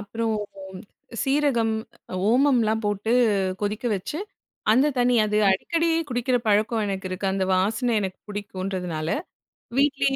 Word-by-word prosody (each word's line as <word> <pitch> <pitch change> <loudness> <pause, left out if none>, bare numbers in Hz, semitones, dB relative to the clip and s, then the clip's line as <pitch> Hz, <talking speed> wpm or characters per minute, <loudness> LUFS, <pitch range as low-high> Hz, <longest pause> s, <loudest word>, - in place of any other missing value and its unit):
அப்புறம் 225 +2 -2 0.9
சீரகம், 270 -5 +2 0.6
ஓமம்லாம் 235 -3 +3
போட்டு 205 +3 -1 0.5
கொதிக்க 215 +4 -2
வச்சு 195 +11 -5 0.5
அந்த 260 +6 +4
தண்ணி 245 0 +3
அது 210 0 0
அடிக்கடி 330 - +1 0.2
குடிக்கிற 245 0 +1
பழக்கம் 215 +2 +2
எனக்கு 190 -1 -3
இருக்கு. 185 +2 -3
அந்த 190 0 0
வாசனை 220 +6 +1
எனக்கு 190 -2 -4
பிடிக்குன்றதுனால. 185 -5 -4 0.7
வீட்டிலேயே 275 -1 +2
220 Hz, 110 wpm, -24 LUFS, 195-250 Hz, 0.9 s, அந்த